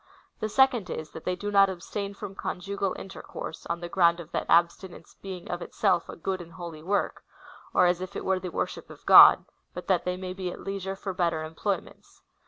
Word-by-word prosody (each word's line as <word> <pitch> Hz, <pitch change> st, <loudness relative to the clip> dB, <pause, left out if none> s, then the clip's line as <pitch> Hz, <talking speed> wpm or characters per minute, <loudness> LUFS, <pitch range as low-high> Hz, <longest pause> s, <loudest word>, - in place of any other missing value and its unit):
The 215 Hz, -, -2 dB
second 250 Hz, -3 st, +3 dB
is, 155 Hz, -1 st, -5 dB
that 160 Hz, -, -10 dB
they 180 Hz, -, 0 dB
do 205 Hz, +2 st, -4 dB
not 195 Hz, -1 st, +6 dB
abstain 200 Hz, +2 st, -5 dB
from 195 Hz, -, -7 dB
conjugal 195 Hz, +1 st, -3 dB
intercourse, 190 Hz, -3 st, -8 dB
on 170 Hz, 0 st, -3 dB
the 175 Hz, -, -4 dB
ground 170 Hz, -1 st, +3 dB
of 170 Hz, -1 st, -10 dB
that -, -, -2 dB
abstinence 170 Hz, +2 st, +1 dB
being 190 Hz, -2 st, -7 dB
in 175 Hz, 0 st, -4 dB
itself 180 Hz, -1 st, 0 dB
a -, -, -6 dB
good 185 Hz, +2 st, -3 dB
and 170 Hz, -1 st, -12 dB
holy 170 Hz, -3 st, -8 dB
work, 200 Hz, +5 st, -1 dB, 0.5 s
or 180 Hz, -, +4 dB
as 175 Hz, 0 st, +2 dB
if 185 Hz, +1 st, -6 dB
it -, -, -5 dB
were 190 Hz, -1 st, +1 dB
the 185 Hz, -, -5 dB
worship -, -, -4 dB
of -, -, -14 dB
God,^ -, -, +9 dB, 0.3 s
but 180 Hz, -, -6 dB
that 185 Hz, -3 st, +2 dB
they 180 Hz, 0 st, -2 dB
may 185 Hz, 0 st, -5 dB
be 185 Hz, -1 st, -4 dB
at -, -, -9 dB
leisure 195 Hz, -1 st, -4 dB
for 195 Hz, 0 st, -5 dB
better 170 Hz, -3 st, 0 dB
employments. 165 Hz, +6 st, -5 dB
185 Hz, 210 wpm, -27 LUFS, 175-195 Hz, 0.5 s, God,^